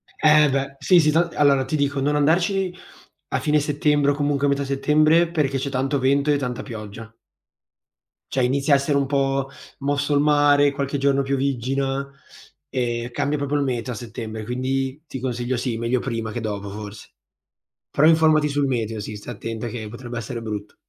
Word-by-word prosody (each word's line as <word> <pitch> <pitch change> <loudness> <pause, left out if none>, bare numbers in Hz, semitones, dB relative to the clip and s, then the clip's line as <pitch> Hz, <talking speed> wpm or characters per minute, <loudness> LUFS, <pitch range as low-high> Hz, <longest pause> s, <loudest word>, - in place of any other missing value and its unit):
Eh 150 -1 +5
beh, 135 0 -2
sì, 180 -2 +5
sì, 155 -1 +3
tant 170 +2 +1
allora 140 -2 +3
ti 145 - -2
dico 140 -1 0
non 145 +2 +1
andarci 175 +5 +1 0.6
a - - 0
fine 150 0 +2
settembre 145 0 +1
o - - +1
comunque 145 0 0
a - - +3
metà 140 0 0
settembre, 155 +4 +3
perché 145 -5 0
c'è 140 +1 -3
tanto 135 +1 -1
vento 140 +3 +2
e 145 - +3
tanta 125 -3 -4
pioggia 110 -2 -9 1.2
cioè, 130 -2 +1
inizia 140 +3 +2
a - - +8
essere 140 +1 0
un 140 - +1
po' 135 -1 0 0.3
mosso 145 +1 0
il 145 - +3
mare, 145 -1 +4
qualche 140 0 -2
giorno 140 0 +2
pioviggina, 135 0 -1 0.6
e 120 -2 -2
cambia 145 +4 -1
proprio 140 +1 -2
il 145 - +1
meteo 125 -2 -2
a - - -7
settembre, 110 -1 -7
quindi 130 +4 -2
ti 130 - -6
consiglio 125 0 -2
sì, 120 -1 -2
meglio 115 +2 0
prima 115 -4 -3
che 120 - -4
dopo 100 -2 -4
forse. 105 0 -9 0.8
Però 150 - +3
informati 155 -2 +4
sul 145 0 0
meteo 115 -4 -2
sì 105 +1 -6
stai 105 +3 -8
attenta 115 +2 -5
che 110 -2 -6
potrebbe 120 +1 -7
essere 115 +1 -5
brutto. 105 -2 -6
135 Hz, 185 wpm, -22 LUFS, 120-145 Hz, 1.2 s, a